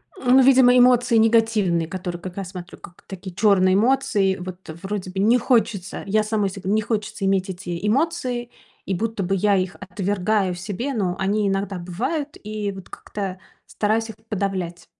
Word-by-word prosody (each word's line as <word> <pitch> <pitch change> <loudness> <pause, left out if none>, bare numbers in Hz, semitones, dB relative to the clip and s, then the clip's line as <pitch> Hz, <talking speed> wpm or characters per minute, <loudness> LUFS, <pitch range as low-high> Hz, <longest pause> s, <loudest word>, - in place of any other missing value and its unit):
Ну, 260 -5 +4
видимо 255 -1 +6
эмоции 245 -1 +5
негативные, 220 -7 +3
которые 175 -1 -5
как 185 0 -8
раз 190 -2 -4
смотрю, 180 -2 -9
как 175 - -14
такие 185 -1 -8
черные 190 -2 +4
эмоции. 205 -4 +2
Вот, 185 0 -9 0.2
вроде 190 -2 -4
бы, 190 - -4
не 225 +5 +4
хочется, 225 -6 0
я 215 +2 +2
самой 215 -2 0
се 195 0 -9
не 210 +3 +1
хочется 210 -2 -3
иметь 195 -1 +1
эти 175 0 -5
эмоции, 255 -2 0 0.4
и 195 - -2
будто 220 +2 -2
бы 195 +2 0
я 200 +1 +2
их 185 -1 -1
отвергаю 200 0 -1
в - - -9
себе, 210 +9 -4
но 185 -5 -1
они 205 +2 +1
иногда 195 0 -1
бывают, 280 - -3
и 210 -1 -3
вот 190 -1 -11
как-то 190 -3 -6 0.3
стараюсь 220 +2 0
их - - -8
подавлять. 185 -5 -3
200 Hz, 170 wpm, -22 LUFS, 185-225 Hz, 0.4 s, видимо